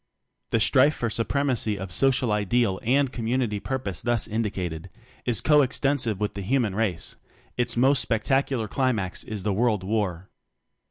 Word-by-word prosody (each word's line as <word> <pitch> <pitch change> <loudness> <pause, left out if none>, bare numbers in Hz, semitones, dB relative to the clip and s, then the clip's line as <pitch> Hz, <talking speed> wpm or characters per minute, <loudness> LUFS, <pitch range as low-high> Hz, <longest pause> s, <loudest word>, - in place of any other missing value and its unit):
The 115 - +1
strife 140 +6 +4
for 115 -2 -2
supremacy 120 -2 0
of 95 -1 -6
social 125 +4 +2
ideal 105 -1 +1
and 135 +3 +2
community 115 -2 -1
purpose 120 -7 -4
thus 120 -2 0
indicat 105 -6 -2
ed, 80 +4 -9 0.4
is 120 -3 +1
co 150 -1 +5
extensive 130 -5 0
with 105 0 -1
the 100 - -6
human 115 0 0
race; 100 -5 -2 0.4
its 120 -1 -1
most 135 +3 +4
spectacular 125 0 0
climax 110 -8 -1
is 105 -3 -6
the 105 - 0
World 110 -2 +1
War. 95 -3 -2
115 Hz, 155 wpm, -25 LUFS, 100-130 Hz, 0.4 s, co